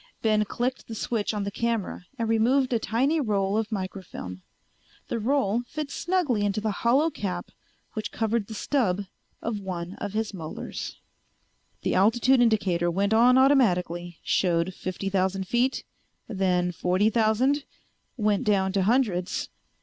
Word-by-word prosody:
Ben 215 -1 +3
clicked 250 +5 -3
the 225 - -6
switch 220 -1 -1
on 210 -2 -2
the 200 - -3
camera 225 -5 -2
and 230 -2 -1
removed 250 +4 +2
a 230 - +2
tiny 265 +9 +1
roll 200 -5 0
of 220 +1 -1
microfilm. 185 - -5 0.7
The 235 - -1
roll 240 -2 +1
fit 300 -2 -5
snugly 340 - 0
into 205 0 0
the 215 0 -1
hollow 275 +8 +3
cap 185 -9 -4 0.4
which 215 -2 -4
covered 225 -1 -1
the 220 - -7
stub 205 -6 0 0.4
of 225 -2 -2
one 180 -2 -5
of 205 -1 -4
his 220 -1 -2
molars. 160 -5 -6 0.9
The - - 0
altitude 240 +6 +4
indicator 190 -7 +2
went 200 +4 +1
on 245 +3 +6
automatically, 180 - +2
showed 175 0 +1
fifty 185 +2 -5
thousand 190 0 0
feet, 245 +5 +1 0.4
then 180 -4 +1
forty 185 +5 +1
thousand, 240 +6 +2 0.5
went 210 -3 +1
down 195 -2 +2
to 195 - +2
hundreds. 200 -4 +1
215 Hz, 145 wpm, -26 LUFS, 190-240 Hz, 0.9 s, on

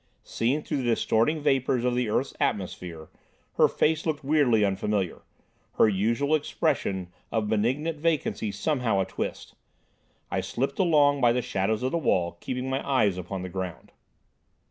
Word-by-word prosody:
Seen 135 +6 -1
through - - -2
the 135 - -2
distorting 115 +5 +2
vapours 130 -3 +1
of 125 - +2
the 125 -2 0
earth's 130 +5 0
atmosphere, 90 -5 -3 0.5
her - - +6
face 160 0 +1
looked 155 -3 -2
weirdly 135 -7 +3
unfamiliar, 100 -1 -1 0.5
her - - +5
usual 115 +9 +1
expression 95 - -1 0.2
of 110 -2 0
benignant 135 +9 0
vacancy 155 -9 0
somehow 115 -1 0
a 95 - +1
twist. - - -5 0.8
I - - 0
slipped 135 +3 -3
along 145 -6 +4
by 120 - +5
the 125 0 0
shadows 105 +4 -1
of 130 - 0
the 170 - 0
wall, 85 - 0
keeping 125 +5 -4
my 135 +1 -1
eyes 115 -9 +2
upon 90 +1 -5
the 95 - -5
ground. 90 -1 -6
120 Hz, 155 wpm, -27 LUFS, 100-140 Hz, 0.8 s, her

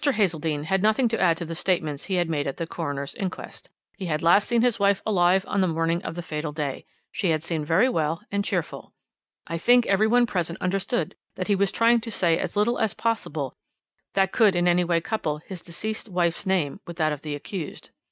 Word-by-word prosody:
Hazeldene 165 - +1
had 190 +4 0
nothing 220 +4 +3
to 225 - -1
add 170 -3 +4
to 170 - -4
the 165 - -5
statements 160 -4 -1
he 190 - -1
had 175 -1 +1
made 150 -3 -1
at 135 - -4
the 165 - -2
coroner's 145 -4 -4
inquest. 190 -4 -6 0.3
He 190 - -4
had 155 -1 -1
last 175 +5 +5
seen 235 -1 +2
his 240 -3 +2
wife 200 -1 +2
alive 190 -2 +3
on 200 - 0
the 185 - +3
morning 165 +1 0
of - - -6
the 175 - -5
fatal 150 -1 -4
day. 145 -3 -4 0.3
She 195 -5 -1
had 155 -1 +1
seemed 160 -3 -3
very 185 +10 +4
well 160 -7 -1
and 200 0 0
cheerful. - - -3 0.5
"I 165 - -4
think 245 +6 +5
every 200 +2 +3
one 240 +2 +4
present 175 -5 -2
understood 195 +6 -1 0.2
that 185 - -4
he 205 - +4
was 195 0 +2
trying 230 0 +4
to 230 - -6
say 170 -6 +2
as - - -3
little 210 +4 +2
as 220 -2 0
possible 160 - -2 0.6
that 195 -1 +3
could 210 -5 +4
in 175 0 +2
any 175 0 +4
way 170 -1 +1
couple 160 -6 -2
his 175 +3 -9
deceased 215 +6 -5
wife's 175 +1 0
name 180 -5 0
with 170 0 -8
that 155 -2 +1
of 145 - -7
the 150 -1 -4
accused. 160 +3 -7
175 Hz, 220 wpm, -25 LUFS, 160-205 Hz, 0.6 s, last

